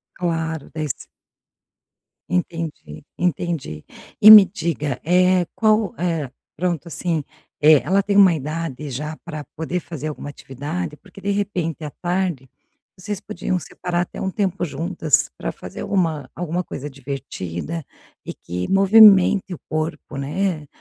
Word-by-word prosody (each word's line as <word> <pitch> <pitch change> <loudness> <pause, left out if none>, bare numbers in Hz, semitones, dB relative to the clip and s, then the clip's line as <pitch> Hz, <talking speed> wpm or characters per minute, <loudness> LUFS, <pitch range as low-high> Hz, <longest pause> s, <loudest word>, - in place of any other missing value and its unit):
Claro, 160 -3 -2
des 155 -3 -2 1.4
Entendi, 165 - -4
entendi. 165 - -2 0.4
E 215 - +10
me 210 -3 +12
diga, 155 -7 -3
eh, 180 +1 +3
qual, 215 -2 +2
eh, 165 -6 -1 0.3
pronto, 175 0 -2
assim, 165 -2 -2 0.4
eh, 150 -1 +6
ela 195 +2 +2
tem 200 0 0
uma 195 -3 +8
idade 150 -1 -4
já 150 +5 -4
pra 155 -4 -6
poder 165 +3 -3
fazer 155 -3 -7
alguma 145 -1 -6
atividade? 150 +5 -5
Porque, 195 - -16
de 200 - -2
repente, 175 -6 -2
à 150 - -5
tarde, 175 -6 -2 0.5
vocês 200 +2 -5
podiam 185 -3 -3
separar 175 +2 -3
até 175 - -7
um 190 - -1
tempo 190 -2 -1
juntas 160 -1 0
pra - - -4
fazer - - -9
alguma 160 -8 -1
alguma 175 +1 -2
coisa 145 -2 -6
divertida 135 - -6 0.4
e - - -5
que 90 +1 -5
movimente 195 -1 +6
o 175 - -5
corpo, 155 -2 -3
né. 155 +3 -2
165 Hz, 135 wpm, -21 LUFS, 150-185 Hz, 1.4 s, me